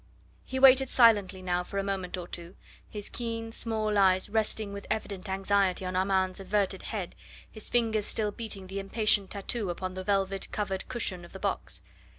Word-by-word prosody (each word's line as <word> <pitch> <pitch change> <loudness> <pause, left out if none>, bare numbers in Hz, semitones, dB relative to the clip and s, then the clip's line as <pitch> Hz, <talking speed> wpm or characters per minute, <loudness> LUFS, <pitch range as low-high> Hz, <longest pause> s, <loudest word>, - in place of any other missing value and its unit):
He 260 - -5
waited 265 0 +7
silently 205 -6 +4
now 180 -1 0
for 200 - -6
a 195 - +1
moment 190 -2 -3
or 175 -1 -6
two, 170 +1 -7 0.3
his 205 -1 -4
keen, 230 -1 -4
small 215 -2 0
eyes 190 +1 +3
resting 215 -1 0
with 200 - -7
evident 200 -3 -3
anxiety 190 -1 +1
on 185 0 -3
Armand's 190 0 +1
averted 195 0 0
head, 195 -5 -4 0.4
his 215 - -7
fingers 220 -3 +2
still 210 -2 +1
beating 205 -3 -5
the 195 +1 -5
impatient 200 0 +2
tattoo 205 0 -2
upon 185 +1 -4
the 185 0 -5
velvet 195 0 0
covered 195 -2 -2
cushion 210 -8 -2
of 175 - -13
the 190 - -8
box. - - -3
200 Hz, 175 wpm, -29 LUFS, 185-220 Hz, 0.4 s, waited